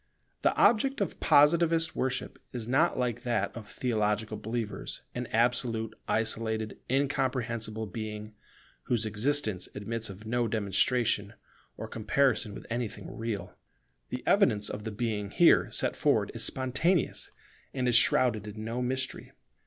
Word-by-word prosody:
The - - +2
object 270 +4 +4
of 200 - -2
Positivist 165 +2 +4
worship 130 0 -2
is 120 -3 -5
not 150 +7 +2
like 125 -3 -1
that 115 -5 -1
of 115 -3 -8
theological 110 -2 -1
believers 110 -1 -4
an 125 0 -4
absolute, 115 -1 +1
isolated, 110 -1 -1
incomprehensible 125 -5 -1
Being, 105 +1 -6 0.5
whose 115 -2 0
existence 110 -3 0
admits 110 +2 -3
of 100 +3 -10
no 120 +1 0
demonstration, 105 0 +1 0.4
or - - -5
comparison 115 0 +1
with - - -9
anything 120 -1 -4
real. 115 -3 -4 0.5
The - - -5
evidence 105 -1 +3
of 105 +1 -6
the 110 - -3
Being 105 -2 -2
here - - +5
set - - 0
forward - - +2
is - - -1
spontaneous, 140 +6 +1 0.4
and 130 -2 -1
is 120 - +3
shrouded 115 -3 +4
in 110 +1 -7
no 115 +2 -2
mystery. 130 +1 -3
115 Hz, 135 wpm, -29 LUFS, 110-130 Hz, 0.5 s, here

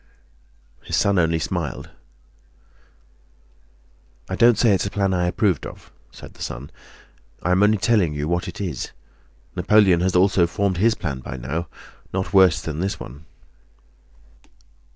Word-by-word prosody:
His - - -3
son 100 -2 +2
only 80 -1 +2
smiled. 80 - -4 2.4
"I 95 - -3
don't 120 +1 +5
say 115 -1 +4
it's 95 0 0
a - - -2
plan 100 -1 0
I 90 -1 +1
approve 95 - 0
of," - - -10 0.2
said - - -13
the - - -17
son; 65 +4 -6 0.7
"I 90 - 0
am 90 +2 +3
only 105 +1 +4
telling 95 -5 +1
you 75 +1 -3
what 85 +1 -1
it - - -8
is. 90 -10 -4 0.6
Napoleon 95 -1 +4
has 95 0 0
also 90 -1 +4
formed 95 +1 -1
his 110 +4 +3
plan 70 -7 -4
by 65 0 -7
now, 75 +7 -4 0.4
not 95 +1 -3
worse 95 -4 +5
than 80 -1 -5
this 95 +3 -2
one." 70 +6 -10
90 Hz, 150 wpm, -22 LUFS, 80-100 Hz, 2.4 s, don't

